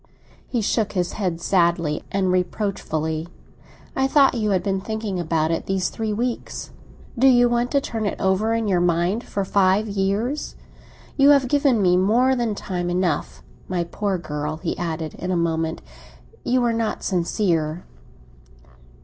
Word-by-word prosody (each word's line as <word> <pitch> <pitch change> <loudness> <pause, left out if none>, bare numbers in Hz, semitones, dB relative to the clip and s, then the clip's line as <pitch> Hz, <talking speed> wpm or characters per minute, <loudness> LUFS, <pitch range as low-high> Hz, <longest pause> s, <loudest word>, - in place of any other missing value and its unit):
He 240 - -1
shook 210 0 0
his 180 -3 -1
head, 180 -5 -2
sadly 170 -4 +1
and 190 -2 +1
reproachfully. 175 -4 -2 0.7
"I 265 0 +2
thought 275 0 +5
you 220 -4 0
had 185 -3 +1
been 195 -1 -1
thinking 215 -2 -3
about 160 -1 0
it 165 - -2
these 190 -1 0
three 220 -2 -3
weeks. 235 +3 -3 0.5
Do 265 - +6
you 245 -2 +6
want 240 +1 0
to 280 +1 +2
turn 225 -5 -3
it - - -3
over 205 +4 +1
in 225 -1 -1
your 185 -3 +2
mind 175 +6 +1
for 200 -1 -3
five 195 +2 +2
years? 205 +8 -1 0.6
You 280 0 +6
have 280 -3 +5
given 275 -6 +2
me 180 -1 +4
more 240 +8 +3
than 235 -4 -1
time 180 -3 -3
enough. 175 -3 -1 0.2
My 180 -2 -1
poor 195 +3 -2
girl," 150 -2 -4
he - - -3
added 160 -2 -4
in 180 - -4
a 185 - +1
moment, 165 -1 -1 0.6
"you 250 0 +1
are 235 -1 +2
not 225 -1 -2
sincere!" 170 -3 0
195 Hz, 160 wpm, -22 LUFS, 175-225 Hz, 0.7 s, Do